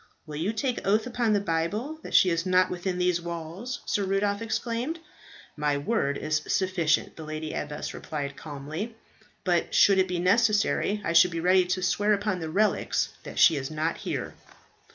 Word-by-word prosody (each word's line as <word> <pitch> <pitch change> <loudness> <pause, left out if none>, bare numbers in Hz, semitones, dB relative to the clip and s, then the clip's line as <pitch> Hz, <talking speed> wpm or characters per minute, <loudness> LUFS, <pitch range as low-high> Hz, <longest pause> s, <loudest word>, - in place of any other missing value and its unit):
"Will 150 -2 -7
you 175 +7 0
take 245 +3 -1
oath 215 +3 +3
upon 240 -3 0
the 205 - +3
Bible 200 - -2
that - - -5
she 185 - +6
is 165 0 0
not 185 0 +3
within 180 0 -3
these 180 -1 +1
walls?" 170 +8 -6
Sir 205 - 0
Rudolph 200 +2 0
exclaimed. 235 +6 -2 0.6
"My 150 -1 0
word 140 -3 0
is 155 0 -1
sufficient," 185 -5 +1
the 160 - -7
lady 155 0 -5
abbess 150 0 -4
replied 140 -2 -5
calmly. 155 - -6 0.5
"But 175 -2 0
should 195 -1 +6
it 190 - +3
be 180 -1 -2
necessary, 210 +2 +2
I 170 - 0
should 170 +2 +7
be 165 -1 -4
ready 180 +2 +4
to 185 +1 -2
swear 205 +3 +2
upon 205 -2 -1
the 160 -2 -4
relics 205 +6 +1
that - - -9
she 160 - +6
is 135 -1 -4
not 155 +1 -2
here." - - -4
180 Hz, 180 wpm, -27 LUFS, 160-210 Hz, 0.6 s, should